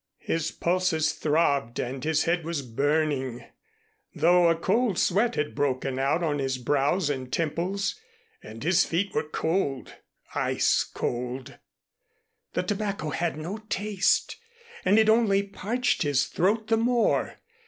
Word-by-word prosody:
His 165 Hz, -1 st, -1 dB
pulses 170 Hz, -3 st, 0 dB
throbbed 140 Hz, -6 st, +1 dB
and 130 Hz, +1 st, -4 dB
his 160 Hz, -1 st, +2 dB
head 170 Hz, 0 st, 0 dB
was 160 Hz, -3 st, -3 dB
burning, 140 Hz, 0 st, -1 dB, 0.7 s
though 175 Hz, +2 st, +4 dB
a 165 Hz, -, +3 dB
cold 200 Hz, +4 st, +1 dB
sweat 225 Hz, +6 st, +2 dB
had 150 Hz, 0 st, -2 dB
broken 135 Hz, -1 st, -1 dB
out 140 Hz, +6 st, +1 dB
on 145 Hz, -3 st, 0 dB
his 135 Hz, -1 st, -1 dB
brows 145 Hz, +7 st, +1 dB
and 130 Hz, -3 st, -3 dB
temples, 180 Hz, +5 st, -1 dB, 0.4 s
and 110 Hz, +3 st, -10 dB
his 175 Hz, +3 st, +4 dB
feet 190 Hz, +4 st, -1 dB
were 150 Hz, -, -2 dB
cold 160 Hz, -5 st, -1 dB, 0.4 s
ice -, -, +2 dB
cold. 125 Hz, +2 st, -5 dB, 0.9 s
The -, -, 0 dB
tobacco 200 Hz, -6 st, -2 dB
had 170 Hz, -1 st, -2 dB
no 170 Hz, +7 st, -5 dB
taste, 205 Hz, -1 st, +1 dB, 0.5 s
and 205 Hz, -, +4 dB
it 220 Hz, -1 st, +5 dB
only 220 Hz, -3 st, +4 dB
parched 215 Hz, +5 st, -1 dB
his 145 Hz, -4 st, +2 dB
throat 215 Hz, +8 st, 0 dB
the 225 Hz, -, +4 dB
more. 235 Hz, +1 st, +1 dB
165 Hz, 135 wpm, -26 LUFS, 140-195 Hz, 0.9 s, it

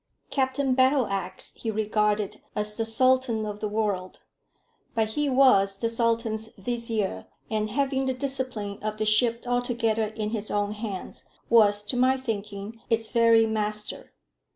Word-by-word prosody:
Captain 265 Hz, 0 st, +1 dB
Battleax 255 Hz, -8 st, +1 dB
he 225 Hz, -, -4 dB
regarded 210 Hz, -1 st, 0 dB
as 210 Hz, 0 st, -1 dB
the 225 Hz, +1 st, -2 dB
sultan 250 Hz, -1 st, +2 dB
of 210 Hz, -1 st, -5 dB
the 210 Hz, -, -2 dB
world; 205 Hz, -4 st, -2 dB, 0.8 s
but 220 Hz, -1 st, +1 dB
he 290 Hz, +6 st, 0 dB
was 255 Hz, -8 st, +4 dB
the 230 Hz, +2 st, -1 dB
sultan's 230 Hz, -1 st, 0 dB
vizier, 220 Hz, -, -2 dB, 0.2 s
and 215 Hz, 0 st, 0 dB
having 270 Hz, +2 st, 0 dB
the 260 Hz, -, +1 dB
discipline 255 Hz, -7 st, -3 dB
of 215 Hz, 0 st, -3 dB
the 215 Hz, -, -1 dB
ship 230 Hz, +2 st, +3 dB
altogether 240 Hz, -3 st, 0 dB
in 215 Hz, 0 st, -4 dB
his 215 Hz, -2 st, -3 dB
own 205 Hz, 0 st, 0 dB
hands, 210 Hz, -3 st, -6 dB, 0.3 s
was, 205 Hz, -3 st, +5 dB
to 210 Hz, -, -4 dB
my 260 Hz, +1 st, +4 dB
thinking, 210 Hz, -2 st, -5 dB
its 225 Hz, 0 st, +1 dB
very 230 Hz, -1 st, +4 dB
master. 210 Hz, -1 st, -3 dB
220 Hz, 145 wpm, -26 LUFS, 210-245 Hz, 0.8 s, was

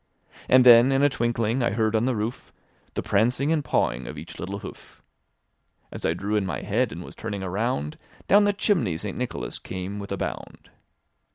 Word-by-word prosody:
And 130 Hz, 0 st, +6 dB
then 120 Hz, +2 st, +8 dB
in 135 Hz, +1 st, +2 dB
a 145 Hz, -, +5 dB
twinkling, 120 Hz, -1 st, 0 dB
I 120 Hz, -, +2 dB
heard 110 Hz, +2 st, 0 dB
on 110 Hz, +2 st, +2 dB
the 130 Hz, -1 st, +1 dB
roof 110 Hz, +4 st, -4 dB, 0.4 s
The -, -, -2 dB
prancing 125 Hz, +8 st, +1 dB
and 155 Hz, -3 st, +1 dB
pawing 65 Hz, -, 0 dB
of -, -, -7 dB
each -, -, -9 dB
little 100 Hz, +2 st, -4 dB
hoof. -, -, -11 dB, 0.9 s
As -, -, -3 dB
I -, -, 0 dB
drew 105 Hz, +2 st, -2 dB
in 105 Hz, -, +2 dB
my 95 Hz, -, -3 dB
head, 115 Hz, +5 st, 0 dB
and 85 Hz, -, -7 dB
was -, -, -11 dB
turning 100 Hz, -3 st, -5 dB
around, 95 Hz, -, -2 dB, 0.3 s
Down 205 Hz, +1 st, +6 dB
the 205 Hz, -, +4 dB
chimney 170 Hz, -, +1 dB
St. 100 Hz, +3 st, -5 dB
Nicholas 125 Hz, -1 st, -4 dB
came 95 Hz, +2 st, -6 dB
with 100 Hz, -1 st, -8 dB
a 100 Hz, -, -2 dB
bound. -, -, -6 dB
110 Hz, 195 wpm, -25 LUFS, 100-125 Hz, 0.9 s, then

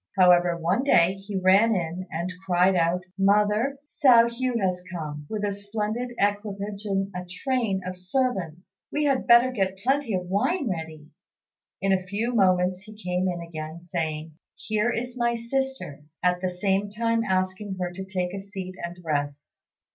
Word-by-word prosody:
However, 175 Hz, -2 st, +5 dB
one 175 Hz, +9 st, +1 dB
day 180 Hz, -10 st, +4 dB
he 195 Hz, +1 st, -8 dB
ran 195 Hz, +4 st, +5 dB
in 175 Hz, +1 st, -3 dB
and 170 Hz, +3 st, -3 dB
cried 185 Hz, 0 st, +3 dB
out, 175 Hz, +1 st, +1 dB, 0.2 s
"Mother, 210 Hz, +7 st, +3 dB
Hsiao 250 Hz, -6 st, +5 dB
hui 245 Hz, +1 st, -1 dB
has 185 Hz, -3 st, 0 dB
come, 150 Hz, -4 st, -6 dB
with 215 Hz, -1 st, -3 dB
a 205 Hz, -, +1 dB
splendid 215 Hz, +4 st, -3 dB
equipage 205 Hz, 0 st, -2 dB
and 195 Hz, -1 st, -1 dB
a 180 Hz, 0 st, -4 dB
train 200 Hz, +2 st, -1 dB
of 185 Hz, 0 st, -4 dB
servants; 185 Hz, -, -3 dB
we 295 Hz, -, 0 dB
had 275 Hz, -3 st, +1 dB
better 240 Hz, +2 st, +7 dB
get 195 Hz, -5 st, -1 dB
plenty 260 Hz, +1 st, 0 dB
of 180 Hz, -1 st, -2 dB
wine 235 Hz, -, 0 dB
ready." 160 Hz, -5 st, -5 dB, 0.8 s
In 195 Hz, 0 st, +3 dB
a 190 Hz, -, +2 dB
few 205 Hz, +6 st, -2 dB
moments 185 Hz, -3 st, +3 dB
he 215 Hz, +2 st, -13 dB
came 180 Hz, -2 st, -1 dB
in 175 Hz, -2 st, -2 dB
again, 160 Hz, -1 st, -7 dB
saying, 160 Hz, -2 st, -4 dB, 0.2 s
"Here 215 Hz, +2 st, 0 dB
is 245 Hz, +2 st, -3 dB
my 235 Hz, 0 st, +2 dB
sister," 265 Hz, -, -3 dB, 0.2 s
at 180 Hz, 0 st, +2 dB
the 185 Hz, -, 0 dB
same 195 Hz, +2 st, 0 dB
time 230 Hz, +2 st, 0 dB
asking 190 Hz, 0 st, -1 dB
her 180 Hz, -1 st, -2 dB
to 190 Hz, +2 st, -6 dB
take 185 Hz, -1 st, -3 dB
a 195 Hz, -, -4 dB
seat 195 Hz, -1 st, -7 dB
and 170 Hz, +1 st, -5 dB
rest. 145 Hz, -2 st, -3 dB
195 Hz, 170 wpm, -26 LUFS, 180-225 Hz, 0.8 s, better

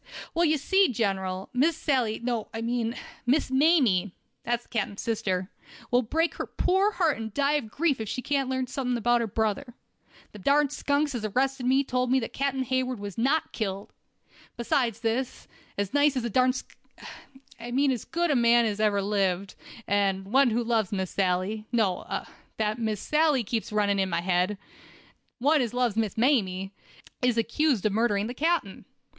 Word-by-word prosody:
"Well, 340 Hz, +1 st, +2 dB
ye 310 Hz, -1 st, +3 dB
see, 380 Hz, +6 st, +3 dB
General, 190 Hz, -4 st, -2 dB
Miss 295 Hz, +6 st, +2 dB
Sally—no, 240 Hz, -5 st, -1 dB
I 225 Hz, -, -3 dB
mean 235 Hz, 0 st, -1 dB, 0.3 s
Miss 265 Hz, +1 st, +2 dB
Mamie—that's 240 Hz, -, +1 dB
the -, -, -29 dB
captain's 205 Hz, -3 st, -3 dB
sister—will 220 Hz, +2 st, -2 dB
break 320 Hz, +8 st, 0 dB
her -, -, -4 dB
poor 385 Hz, +3 st, +1 dB
heart 325 Hz, -8 st, +1 dB
and 220 Hz, -1 st, -5 dB
die 280 Hz, 0 st, +2 dB
of 290 Hz, -7 st, -1 dB
grief 285 Hz, -2 st, 0 dB
if 220 Hz, -, -4 dB
she 255 Hz, -, -4 dB
can't 275 Hz, -3 st, 0 dB
learn 260 Hz, 0 st, -1 dB
something 250 Hz, -1 st, -2 dB
about 240 Hz, +1 st, +2 dB
her 230 Hz, -, -1 dB
brother. 220 Hz, +4 st, -2 dB, 0.6 s
Them 210 Hz, -, -11 dB
darn 285 Hz, +6 st, +3 dB
skunks 290 Hz, 0 st, 0 dB
as 240 Hz, -3 st, -4 dB
arrested 255 Hz, +4 st, 0 dB
me 265 Hz, +2 st, +4 dB
told 250 Hz, -2 st, -1 dB
me 265 Hz, +1 st, +4 dB
that 230 Hz, -, -6 dB
Captain 275 Hz, -1 st, -1 dB
Hayward 255 Hz, -2 st, -1 dB
was 200 Hz, -1 st, -6 dB
not 275 Hz, +7 st, +1 dB
killed. 200 Hz, -2 st, -4 dB, 0.6 s
Besides 235 Hz, -2 st, 0 dB
this, 240 Hz, +3 st, -2 dB, 0.3 s
as 200 Hz, +1 st, -2 dB
nice 290 Hz, -1 st, +3 dB
a 245 Hz, -2 st, -1 dB
darn 255 Hz, +3 st, +3 dB
sk— 255 Hz, -, -8 dB, 0.8 s
I 235 Hz, +1 st, -7 dB
mean 270 Hz, +3 st, +2 dB
as 245 Hz, -4 st, -3 dB
good 340 Hz, 0 st, -1 dB
a -, -, +2 dB
man 235 Hz, -1 st, +4 dB
as 210 Hz, -2 st, -2 dB
ever 205 Hz, -2 st, +2 dB
lived, 195 Hz, -2 st, 0 dB, 0.3 s
and 195 Hz, 0 st, 0 dB
one 270 Hz, -1 st, +5 dB
who 235 Hz, +2 st, 0 dB
loves 225 Hz, -4 st, 0 dB
Miss 190 Hz, -3 st, -2 dB
Sally—no—that 210 Hz, +2 st, -2 dB
Miss 220 Hz, -3 st, -1 dB
Sally 300 Hz, -4 st, +2 dB
keeps 225 Hz, +1 st, -3 dB
running 205 Hz, -1 st, +1 dB
in 190 Hz, -1 st, +1 dB
my 170 Hz, -, -1 dB
head—one 205 Hz, -, -2 dB
as 245 Hz, -1 st, -2 dB
loves 245 Hz, -4 st, +1 dB
Miss 220 Hz, -3 st, -1 dB
Mamie, 195 Hz, -7 st, +1 dB, 0.5 s
is 250 Hz, -2 st, +2 dB
accused 235 Hz, 0 st, +1 dB
of 215 Hz, -, +3 dB
murdering 210 Hz, -2 st, +1 dB
the 240 Hz, -, -4 dB
captain. 315 Hz, -, -1 dB
235 Hz, 170 wpm, -27 LUFS, 210-270 Hz, 0.8 s, one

